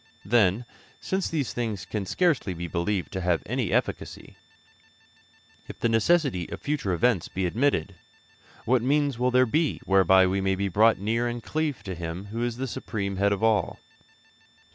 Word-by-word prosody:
Then, 110 Hz, +1 st, +2 dB, 0.3 s
since 190 Hz, 0 st, -2 dB
these 150 Hz, -6 st, -2 dB
things 110 Hz, -7 st, -3 dB
can 100 Hz, +1 st, -4 dB
scarcely 145 Hz, -, +1 dB
be 85 Hz, +1 st, -5 dB
believed 85 Hz, 0 st, -2 dB
to 95 Hz, -, -4 dB
have 90 Hz, -1 st, 0 dB
any -, -, -2 dB
efficacy, -, -, -3 dB, 1.3 s
if -, -, -9 dB
the 115 Hz, -, +1 dB
necessity 115 Hz, -, +2 dB
of -, -, -6 dB
future 145 Hz, -10 st, -2 dB
events 95 Hz, +1 st, +1 dB
be 95 Hz, 0 st, -3 dB
admitted, 115 Hz, -, 0 dB, 0.7 s
what 125 Hz, 0 st, +3 dB
means 140 Hz, 0 st, +1 dB
will 125 Hz, +1 st, +2 dB
there 125 Hz, 0 st, +4 dB
be 155 Hz, +6 st, 0 dB
whereby 95 Hz, -1 st, +5 dB
we 95 Hz, +1 st, 0 dB
may 95 Hz, 0 st, +1 dB
be 100 Hz, +1 st, -1 dB
brought 110 Hz, +5 st, +4 dB
near 115 Hz, +5 st, -1 dB
and 120 Hz, -1 st, -4 dB
cleave 155 Hz, -4 st, -2 dB
to 95 Hz, -, -5 dB
Him 85 Hz, +2 st, -6 dB
who 115 Hz, +2 st, -3 dB
is 120 Hz, -1 st, -2 dB
the 130 Hz, -, -2 dB
supreme 100 Hz, -5 st, -4 dB
Head 100 Hz, +1 st, +2 dB
of 100 Hz, +2 st, -1 dB
all? 110 Hz, -2 st, +2 dB
110 Hz, 170 wpm, -26 LUFS, 95-125 Hz, 1.3 s, whereby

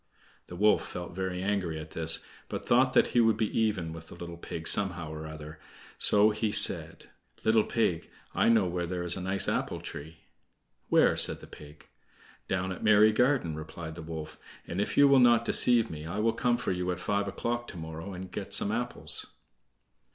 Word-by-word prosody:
The 90 Hz, -, -9 dB
wolf 105 Hz, +4 st, +2 dB
felt 90 Hz, -1 st, -7 dB
very 95 Hz, -1 st, -4 dB
angry 95 Hz, -5 st, -2 dB
at 80 Hz, 0 st, -9 dB
this, 80 Hz, 0 st, 0 dB, 0.2 s
but -, -, -6 dB
thought 130 Hz, +2 st, +3 dB
that -, -, +3 dB
he 120 Hz, -, +3 dB
would 115 Hz, -1 st, +2 dB
be 110 Hz, -2 st, -2 dB
even 100 Hz, -8 st, -1 dB
with 80 Hz, 0 st, -10 dB
the -, -, -11 dB
little 85 Hz, 0 st, -8 dB
pig 80 Hz, -1 st, -7 dB
somehow 85 Hz, -6 st, +3 dB
or 80 Hz, 0 st, -7 dB
other, 75 Hz, 0 st, -10 dB, 0.4 s
so 105 Hz, +1 st, +5 dB
he 105 Hz, 0 st, -2 dB
said: -, -, +2 dB, 0.3 s
"Little 110 Hz, -1 st, +3 dB
pig, 90 Hz, -9 st, -1 dB, 0.2 s
I -, -, +2 dB
know 110 Hz, -4 st, +4 dB
where 90 Hz, -1 st, -3 dB
there 90 Hz, 0 st, -4 dB
is 85 Hz, 0 st, +2 dB
a 95 Hz, -, -6 dB
nice 95 Hz, +2 st, 0 dB
apple -, -, -2 dB
tree." 80 Hz, +2 st, -9 dB, 0.7 s
"Where?" -, -, +4 dB
said -, -, +4 dB
the -, -, -12 dB
pig. 75 Hz, 0 st, -14 dB, 0.6 s
"Down 95 Hz, 0 st, -2 dB
at 90 Hz, -, -7 dB
Merry 105 Hz, 0 st, +5 dB
garden," 125 Hz, -, +1 dB
replied 80 Hz, +1 st, -8 dB
the 85 Hz, -, -9 dB
wolf, 80 Hz, -1 st, -8 dB, 0.3 s
"and 90 Hz, +4 st, -3 dB
if -, -, -3 dB
you 140 Hz, -, +7 dB
will 140 Hz, -1 st, +5 dB
not 120 Hz, -2 st, +4 dB
deceive 115 Hz, -1 st, +4 dB
me 75 Hz, 0 st, -8 dB
I 90 Hz, +5 st, -5 dB
will 110 Hz, +1 st, +1 dB
come 120 Hz, -1 st, 0 dB
for 125 Hz, -, -3 dB
you 90 Hz, 0 st, -3 dB
at 90 Hz, -, -3 dB
five 100 Hz, 0 st, -1 dB
o'clock 120 Hz, +4 st, -3 dB
to 90 Hz, -, -9 dB
morrow 80 Hz, +3 st, -7 dB
and 95 Hz, 0 st, -8 dB
get -, -, 0 dB
some -, -, 0 dB
apples." -, -, -2 dB
90 Hz, 200 wpm, -28 LUFS, 80-110 Hz, 0.7 s, you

